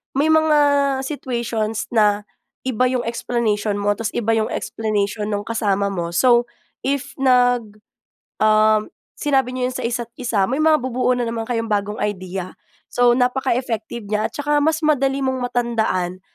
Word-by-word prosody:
may 300 +4 +3
mga 315 -1 +4 0.5
situations 235 -6 -3
na 210 -2 +3 0.4
iba 255 -1 +1
yong 250 -1 -1
explanation 225 -3 -1
mo. 205 0 +1
Tas, 215 +1 -2
iba 225 -1 0
yong 220 -1 +1
explanation 210 -1 -2
ng 205 -1 -2
kasama 200 -3 0
mo. 170 -2 -4
So, 240 +3 +4 0.3
if 275 0 -2
nag 245 -4 +3 0.7
um, 215 0 +4 0.2
sinabi 265 -4 0
niyo 255 0 -1
yon 255 - -9
sa - - -4
isa't-isa, 235 -2 -2
may 265 - 0
mabubuo 260 -5 +2
na 245 - -1
naman 230 -1 -3
kayong 230 -2 -2
bagong 210 0 -1
idea. 185 -2 -4 0.4
So, 245 -1 +3
napaka-effective 245 -3 -1
niya, 210 +1 0
at - - -42
saka 295 0 0
mas 315 +1 +1
madali 275 -2 +2
mong 260 -1 -1
matandaan 220 -7 -1
235 Hz, 145 wpm, -20 LUFS, 210-255 Hz, 0.7 s, mga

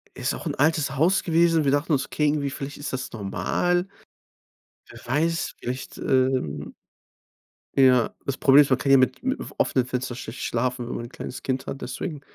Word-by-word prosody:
Ist - - -1
auch - - -8
'n - - -1
altes 145 -2 +1
Haus 180 +7 +3
gewesen, 165 -2 +3
wir 135 - +3
dachten 145 +3 +1
uns, 135 -1 +1
okay, 150 - 0
irgendwie 145 -1 0
vielleicht 140 +1 -6
ist 145 - -5
das 130 0 -4
normal. 120 - -1 1.0
Wer - - -12
weiß, 160 +6 0
vielleicht, 125 +2 -5
ähm 130 - 0 1.0
Ja, 130 -3 +4
das 140 - -2
Problem 145 0 +7
ist, 140 - -3
man 130 - +3
kann 135 +1 -1
ja 135 - +8
mit 130 0 +1
mit 260 +2 -1 0.2
offenen 125 -2 +2
Fenstern 125 -1 -3
schlecht 125 - -8
schlafen, 125 0 -1
wenn - - -4
man 120 - -5
ein 120 - -8
kleines 125 - -8
Kind 130 0 -2
hat, 135 - -5
deswegen, 150 +3 -5
135 Hz, 190 wpm, -25 LUFS, 125-150 Hz, 1.0 s, ja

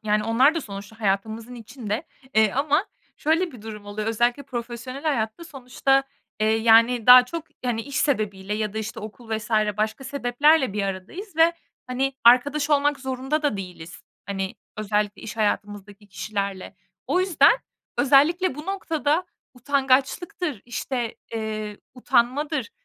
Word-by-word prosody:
yani, 210 0 +1
onlar 255 +7 +4
da 330 - -1
sonuçta 205 -1 -9
hayatımızın 220 +4 -2
içinde. 230 +2 -5 0.3
Eee, 220 -2 +4
ama 295 +7 +1 0.3
şöyle 325 +3 +1
bir 235 -5 -12
durum 210 -2 -9
oluyor 210 +1 -4
özellikle 240 +4 +1
profesyonel 245 +2 -6
hayatta 255 -1 -1
sonuçta, 270 -2 0 0.4
eee, 220 +1 +3
yani, 230 +1 +4
daha 250 0 +10
çok, 330 +4 -6 0.2
hani, 235 -2 -1
iş 280 +3 -7
sebebiyle 210 -7 0
ya 215 -1 -2
da, 220 - -4
işte, 220 0 -5
okul 220 +2 -10
vs. 215 +1 -8 0.3
başka 215 +5 -2
sebeplerle 270 0 +2
bir 205 0 -1
aradayız 200 - -6
ve, 330 +1 +5 0.3
hani, 265 +2 -1
arkadaş 285 +5 +5
olmak 290 -1 +2
zorunda 265 +3 -2
da 285 -9 +1
değiliz. 180 -3 -9 0.2
Hani, 195 -1 -3 0.2
özellikle 210 0 -1
iş 220 - -7
hayatımızdaki 205 -1 -3
kişilerle. 200 0 -4 0.3
O 365 - +2
yüzden 370 -3 +5 0.5
özellikle 290 +4 +4
bu 300 +2 -9
noktada 330 -4 0 0.3
utangaçlıktır, 275 - 0
işte, 240 -1 -3 0.2
eee, 215 -2 -4 0.2
utanmadır, 255 +2 0
240 Hz, 140 wpm, -24 LUFS, 215-285 Hz, 0.5 s, daha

